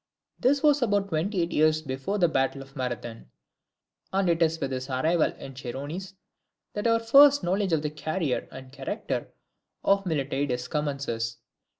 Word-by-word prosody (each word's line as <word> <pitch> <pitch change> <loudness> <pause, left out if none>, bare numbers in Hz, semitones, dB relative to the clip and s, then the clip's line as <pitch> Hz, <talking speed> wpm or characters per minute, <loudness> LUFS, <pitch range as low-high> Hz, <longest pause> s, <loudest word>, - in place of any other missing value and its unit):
This 280 +3 +2
was 295 -2 +4
about 205 -4 +1
twenty 175 +3 0
eight 170 - -3
years 155 0 +3
before 135 +8 -3
the 175 -3 +4
battle 135 -2 0
of 135 0 -19
Marathon, 120 - -5 0.8
and 195 0 +1
it 165 0 -1
is 165 0 +2
with 135 - -2
his 130 +1 -4
arrival 155 +6 +2
in 135 - -10
the 130 - -10
Chersonese 150 +10 -6 0.6
that 205 +2 -1
our 230 0 +4
first 280 +5 +6
knowledge 190 +2 0
of 155 -2 +1
the 150 - -2
career 155 -2 -2
and 130 0 -10
character 135 -1 -4 0.5
of 195 -1 +2
Miltiades 135 -4 -1
commences. 140 -7 -2
155 Hz, 165 wpm, -27 LUFS, 135-195 Hz, 0.8 s, first